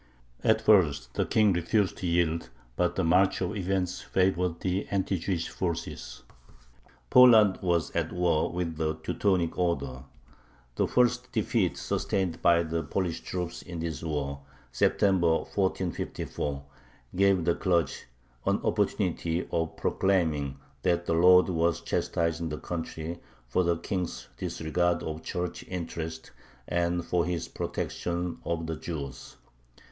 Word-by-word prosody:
At - - +3
first 75 -10 +3
the - - 0
King 105 -3 +4
refused 90 +3 +1
to 90 - -3
yield, 85 -1 +1 0.3
but 90 +3 +1
the 95 - 0
march 90 +3 +3
of 95 +3 -2
events 95 -2 -1
favored 90 -2 0
the 95 +1 -1
anti 95 -1 0
Jewish 85 -1 -2
forces. 70 -8 -4 0.9
Poland 115 -6 +7
was 85 -3 +1
at - - -1
war 90 -3 +1
with 85 -2 -3
the 80 -1 0
Teutonic 85 +2 0
Order. 70 -7 -1 0.7
The - - +1
first 125 0 +2
defeat 110 -4 0
sustained 95 -4 -1
by 85 0 +5
the 80 0 -2
Polish 85 +2 -2
troops 90 -2 -4
in 85 -1 -8
this 80 -2 -3
war 70 -3 -3 0.3
(September, 90 -5 +3 0.2
1454) 90 -6 -2 0.5
gave 95 -2 +3
the 85 - +3
clergy 85 -6 +1 0.5
an - - +3
opportunity 85 +1 0
of 80 -1 -1
proclaiming 80 -8 +1 0.2
that 85 -1 +1
the - - 0
Lord 90 +2 +6
was 85 -2 +1
chastising 85 0 -1
the 75 - -4
country 85 0 -5 0.3
for 80 +10 +1
the 85 -1 +1
King's 90 0 -4
disregard 85 +2 -1
of 80 0 -4
Church 90 -1 -4
interests 80 -2 -5 0.4
and 85 0 0
for 90 -1 +1
his 85 -1 -2
protection 85 0 -3
of 85 -1 -2
the 80 0 -3
Jews. 70 -7 -6
85 Hz, 130 wpm, -28 LUFS, 80-90 Hz, 0.9 s, Poland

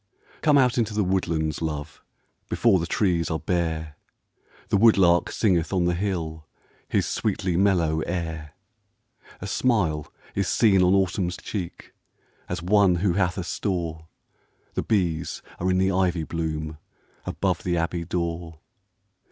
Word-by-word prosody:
COME 150 -2 +4
out 125 -2 +3
into 110 -2 -1
the 105 - +2
woodlands, 85 -5 -1
love, 75 -2 -4 0.5
Before 110 -6 +3
the 85 - -3
trees 85 -4 +1
are 80 - 0
bare; 80 -2 -2 0.7
The - - +3
woodlark 95 -5 +5
singeth 90 -7 +1
on 90 -3 +1
the 90 - +2
hill 85 -4 -3 0.4
His - - +1
sweetly 100 -4 -1
mellow 85 -5 +2
air. 80 -4 -4 0.9
A - - -4
smile 90 - 0 0.2
is 100 -2 0
seen 100 -4 +4
on 90 +1 +4
Autumn's 90 -2 0
cheek, 95 -5 -6 0.6
As 90 -1 -3
one 100 -1 +4
who 90 +1 +1
hath 90 0 0
a 95 - -2
store; 85 -4 -3 0.7
The - - -1
bees 85 -7 -1 0.2
are 90 - 0
in 90 - +2
the 95 +1 +2
ivy 90 -3 +1
bloom, 80 -1 -4 0.5
Above 95 -3 -1
the 90 -1 -1
abbey 85 +1 -1
door. 85 -1 -3
90 Hz, 140 wpm, -25 LUFS, 80-95 Hz, 0.9 s, woodlark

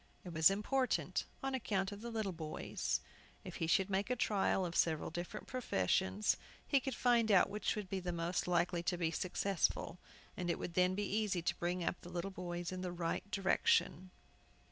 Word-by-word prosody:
It 175 - -6
was 160 +2 +7
important 250 +7 0 0.2
on 270 0 -1
account 200 -6 0
of 205 0 -8
the 235 - -5
little 220 -4 -2
boys. 155 -2 -2 0.4
If - - -7
he 165 - -1
should 190 +3 +3
make 200 +2 0
a 250 - +2
trial 195 -4 +1
of 170 -1 -4
several 160 -2 +1
different 175 +5 -5
professions 95 - +1 0.3
he 280 - +4
could 265 -1 -3
find 235 -3 +3
out 195 - +5
which 210 +1 -1
would 210 -3 -4
be 190 0 -2
the 180 -1 -3
most 170 +1 -1
likely 175 0 +2
to 175 +1 -1
be 165 -2 0
successful, 180 0 0 0.4
and 175 -1 -3
it - - +1
would 170 - -5
then 180 +1 +3
be 205 +1 -1
easy 200 -4 0
to - - -1
bring 175 +1 -1
up 175 - -2
the 175 - -10
little 180 +2 -3
boys 175 -1 -4
in 185 0 -4
the 180 -1 -3
right 175 +3 -2
direction. 190 -2 +2
185 Hz, 195 wpm, -36 LUFS, 175-205 Hz, 0.4 s, was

